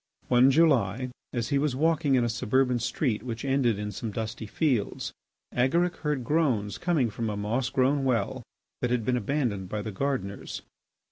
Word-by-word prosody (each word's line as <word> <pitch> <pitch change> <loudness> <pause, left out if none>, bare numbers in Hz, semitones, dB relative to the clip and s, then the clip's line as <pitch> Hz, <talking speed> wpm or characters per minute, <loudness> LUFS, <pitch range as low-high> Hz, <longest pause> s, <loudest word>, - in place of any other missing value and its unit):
One 125 +1 +6
July 130 - +3 0.2
as 120 -2 -2
he 140 -1 +2
was 145 -2 0
walking 150 -1 +2
in 125 - +3
a - - +2
suburban 125 +2 +1
street 115 -1 -1
which 115 +1 -5
ended 135 -5 +2
in 105 0 -4
some 110 +3 -4
dusty 110 +1 -4
fields, 125 -4 -1 0.4
Agaric 170 +8 +2
heard 150 -4 -1
groans 125 -8 +1
coming 155 -10 +1
from 115 +1 -3
a 105 - -3
moss 115 +5 -1
grown 135 +1 +2
well 120 -7 0 0.4
that 125 - +1
had 120 -3 0
been 125 - +2
abandoned 115 -6 -1
by 105 +1 -3
the 110 - -4
gardeners. 100 -3 -3
125 Hz, 175 wpm, -27 LUFS, 110-140 Hz, 0.4 s, One